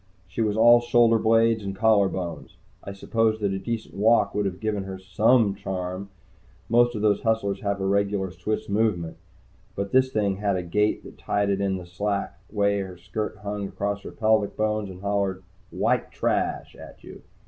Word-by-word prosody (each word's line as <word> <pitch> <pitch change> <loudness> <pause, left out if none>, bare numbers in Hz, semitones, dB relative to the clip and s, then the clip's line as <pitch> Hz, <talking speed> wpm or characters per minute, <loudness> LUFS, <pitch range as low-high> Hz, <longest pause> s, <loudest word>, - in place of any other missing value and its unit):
She 90 +5 -4
was 105 -1 0
all 120 +1 +7
shoulder 120 -1 +4
blades 115 0 +3
and 100 -1 -4
collarbones. 95 -5 0 0.3
I 100 - -6
suppose 110 +2 0
that 100 -2 0
a 95 - -2
decent 115 +2 -5
walk 110 +4 +3
would 105 -1 0
have 95 -1 -5
given 105 -2 -2
her 95 0 -6
some 105 +4 +3
charm 95 -1 -5 0.6
most 120 +1 +4
of 105 - -3
these 105 -2 +3
hustlers 105 -3 0
have 100 -1 -1
a 95 - -2
regular 100 -1 0
Swiss 95 +5 -3
Movement. 100 -6 0 0.6
But 100 0 -3
this 130 0 +3
thing 100 -4 0
had 100 -1 0
a 90 - -2
gait 105 +5 0
that - - -13
tied 100 0 0
in 100 -1 0
with 90 -1 -9
the - - -23
slack 100 +1 -2
way 100 -1 +1
her 95 -2 -6
skirt 105 +4 -5
hung 100 -1 -3
across 100 +1 -3
her - - -8
pelvic 110 -2 +1
bones 110 -1 -1
and 90 0 -10
hollered 100 -2 -1 0.3
"White - - 0
Trash!" - - -1
at - - -13
you. - - -11
100 Hz, 185 wpm, -25 LUFS, 95-110 Hz, 0.6 s, all